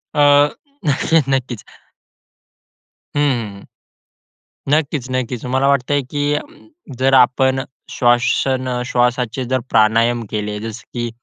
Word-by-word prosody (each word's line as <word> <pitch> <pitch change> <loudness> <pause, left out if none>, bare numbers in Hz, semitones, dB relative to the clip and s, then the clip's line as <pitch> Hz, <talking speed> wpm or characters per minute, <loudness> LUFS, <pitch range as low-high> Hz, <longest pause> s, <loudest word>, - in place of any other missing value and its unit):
अ, - - 0 0.7
नक्कीच, 150 +1 +2
नक्कीच. 130 -4 -2 1.5
हं, 145 - +2
हं, 115 -8 -1
हं. - - -16 1.1
नक्कीच, 150 -4 0
नक्कीच. 130 -2 -3
मला 130 +2 +1
वाटतंय 140 +1 +1
की 145 +2 -1 0.6
जर 135 +1 +2
आपण 130 +1 +3 0.3
श्वासन 130 +1 +1
अ, 125 -1 -2
श्वासाचे 125 0 0
जर 130 +1 0
प्राणायाम 115 +2 +3
केले. 105 -1 -3
जसं 110 +1 -7
की 120 -1 -3
125 Hz, 110 wpm, -18 LUFS, 120-135 Hz, 1.5 s, आपण